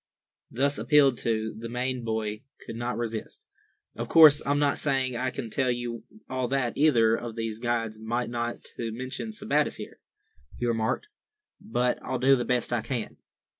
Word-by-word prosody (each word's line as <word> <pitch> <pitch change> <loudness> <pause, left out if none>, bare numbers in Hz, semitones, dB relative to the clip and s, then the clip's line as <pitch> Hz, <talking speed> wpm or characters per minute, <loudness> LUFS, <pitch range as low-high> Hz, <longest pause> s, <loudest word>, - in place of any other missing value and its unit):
Thus 140 +3 0
appealed 140 -4 +4
to, 110 -1 -1
the 115 +1 -7
Maine 125 +1 -2
boy 110 -1 -2 0.2
could - - -7
not 120 +1 -3
resist. 115 -2 -5 0.5
"Of - - -5
course 155 -3 +8
I'm 145 +1 +2
not 145 -1 +2
saying 135 -3 0
I 125 +2 0
can 115 -3 -6
tell 130 +2 +1
you 120 -1 -3 0.2
all 130 -1 -2
that 130 -2 0
either 115 -7 +4
of 115 -1 -6
these 115 -1 -3
guides 115 -2 -1
might—not 120 +1 -2
to 115 -1 -3
mention 130 - -5
Sebattis 210 -9 0
here," - - -9 0.6
he 120 - -2
remarked, 115 - 0 0.5
"but 125 - 0
I'll 130 +1 -2
do 135 +2 +5
the 120 -2 -2
best 125 -1 +1
I 120 - +1
can." 115 0 -4
120 Hz, 170 wpm, -27 LUFS, 115-135 Hz, 0.6 s, course